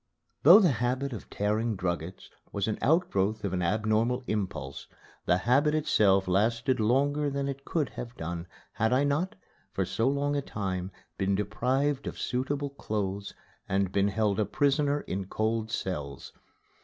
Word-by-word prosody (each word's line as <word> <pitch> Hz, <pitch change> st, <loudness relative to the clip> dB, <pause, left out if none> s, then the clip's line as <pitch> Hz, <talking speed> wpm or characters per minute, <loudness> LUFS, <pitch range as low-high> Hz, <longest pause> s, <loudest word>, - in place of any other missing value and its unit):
Though 175 Hz, +8 st, +9 dB
the 180 Hz, -7 st, +4 dB
habit 130 Hz, +3 st, -1 dB
of 110 Hz, -, -8 dB
tearing 110 Hz, +2 st, 0 dB
druggets 90 Hz, -1 st, -4 dB, 0.2 s
was 100 Hz, -1 st, -1 dB
the 110 Hz, -, -1 dB
outgrowth 110 Hz, -, +1 dB
of 95 Hz, -, -2 dB
an 90 Hz, -, 0 dB
abnormal 110 Hz, +6 st, +1 dB
impulse, 95 Hz, -, -4 dB, 0.4 s
the 90 Hz, -, +4 dB
habit 135 Hz, +9 st, +3 dB
itself 100 Hz, -10 st, +3 dB
lasted 115 Hz, +7 st, +1 dB
longer 140 Hz, +6 st, +2 dB
than 140 Hz, 0 st, -2 dB
it 140 Hz, 0 st, -5 dB
could 155 Hz, -5 st, -1 dB
have 120 Hz, 0 st, -8 dB
done 85 Hz, +1 st, -5 dB, 0.3 s
had 110 Hz, +3 st, +1 dB
I 130 Hz, +2 st, +3 dB
not, 145 Hz, +6 st, 0 dB, 0.4 s
for -, -, -1 dB
so 115 Hz, -, 0 dB
long 140 Hz, +1 st, 0 dB
a 140 Hz, -, +1 dB
time, 95 Hz, -7 st, -3 dB, 0.3 s
been 95 Hz, 0 st, +1 dB
deprived 130 Hz, +8 st, 0 dB
of -, -, -5 dB
suitable 140 Hz, +3 st, -2 dB
clothes 100 Hz, -6 st, -3 dB, 0.3 s
and 95 Hz, -1 st, +1 dB
been 100 Hz, 0 st, +2 dB
held 105 Hz, -1 st, 0 dB
a 105 Hz, -, +2 dB
prisoner 145 Hz, +2 st, +1 dB
in 95 Hz, 0 st, -4 dB
cold 110 Hz, +2 st, -1 dB
cells. 75 Hz, -10 st, -4 dB
110 Hz, 155 wpm, -29 LUFS, 100-140 Hz, 0.4 s, Though